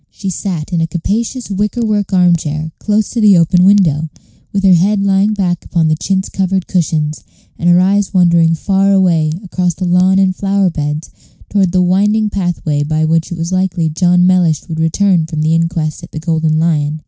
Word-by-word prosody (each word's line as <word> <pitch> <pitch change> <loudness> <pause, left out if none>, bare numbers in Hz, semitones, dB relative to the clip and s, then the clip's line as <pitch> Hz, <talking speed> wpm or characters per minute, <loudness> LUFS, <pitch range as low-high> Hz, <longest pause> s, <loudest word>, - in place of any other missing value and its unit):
She 195 -2 -6
sat 180 -2 -5
in 170 - 0
a 165 - 0
capacious 220 +8 -3
wicker 210 +4 -2
work 205 -2 -1
arm 180 -2 +3
chair 155 0 -4
close 215 0 -1
to 235 - -2
the 205 -3 +5
open 175 +2 +3
window, 170 -6 +3 0.4
with 200 -1 -2
her 190 -1 +5
head 195 +4 +2
lying 200 +2 +1
back 180 -4 -2
upon 165 -2 0
the 155 - +2
chintz 190 +4 -2
covered 190 -1 -2
cushions, 155 -4 -2 0.4
and 175 - +1
her 175 0 +5
eyes 195 +1 +1
wandering 170 -3 +3
far 195 +3 +1
away 170 -5 +2
across 180 -2 -2
the 185 - -4
lawn 180 +2 +2
and 190 -1 +2
flower 195 -1 0
beds 150 0 -4 0.4
toward 195 -3 +1
the 180 0 +2
winding 205 +4 +1
pathway 175 -6 -2
by 155 +2 -1
which 165 +2 0
it 175 - -5
was 165 +2 -4
likely 185 -3 -1
John 180 +3 +2
Mellish 180 -4 +1
would 160 -2 -5
return 165 +1 +1
from 155 -2 -4
the 160 +1 +1
inquest 165 -2 -1
at - - -11
the 155 - -6
Golden 160 -1 0
Lion. 155 -2 0
180 Hz, 195 wpm, -14 LUFS, 160-195 Hz, 0.4 s, the